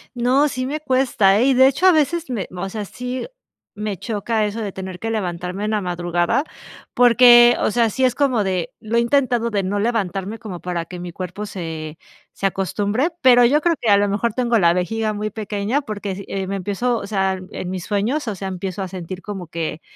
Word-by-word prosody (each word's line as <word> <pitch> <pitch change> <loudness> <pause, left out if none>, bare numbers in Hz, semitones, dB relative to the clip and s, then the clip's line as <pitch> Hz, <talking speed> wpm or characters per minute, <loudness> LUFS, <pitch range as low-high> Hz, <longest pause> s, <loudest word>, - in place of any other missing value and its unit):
No, 260 +5 +3
sí, 255 0 -3
me 300 +3 -3
cuesta, 245 -8 +3
¿eh?, 250 - +3
y 270 - +4
de 260 +1 +6
hecho, 280 +7 +1
a 365 - +7
veces 320 +1 +1
me 220 -7 -2
o 180 +2 -4
sea, 210 +1 -4
sí 250 +5 -5 0.5
me 210 -1 -3
choca 215 +2 -1
eso 210 +2 -4
de 205 -3 -4
tener 190 -1 -7
que 225 - -3
levantarme 185 -2 -3
en 215 - -1
la 215 - +1
madrugada 175 - 0 0.5
porque, 240 0 +7
o - - +1
sea, 235 -1 +2
sí, 260 +5 -2
es 250 -2 +3
como 255 -7 +1
de, 185 -3 -2
lo 220 +2 -1
he - - +5
intentado 240 -1 +1
de 200 -3 -1
no 200 +2 -1
levantarme 205 -2 -1
como 200 -7 -8
para 175 -2 -3
que 180 +1 -9
mi 175 -1 -7
cuerpo 185 +3 -6
se 160 -5 -6 0.4
se 195 - -5
acostumbre. 205 - 0
Pero 245 -1 +7
yo 295 +5 +3
creo 340 0 +2
que 225 - -1
a 200 - +7
lo 200 0 +2
mejor 210 +2 0
tengo 240 -2 +1
la 170 -1 +4
vejiga 215 +4 -1
muy 210 +1 -3
pequeña 215 +4 -2
porque 210 -6 -5
s 195 +1 -6
eh, 195 -1 -3
me 195 +1 -3
empiezo, 205 +6 -1
o - - -6
sea, 190 -2 0
en 180 - -5
mis 185 -1 -5
sueños. 230 +7 -1
O 210 - -2
sea, 190 +1 -5
empiezo 185 +1 -5
a 190 - -4
sentir 185 0 -7
como 195 -4 -7
que 165 -1 -4
210 Hz, 225 wpm, -21 LUFS, 190-240 Hz, 0.5 s, a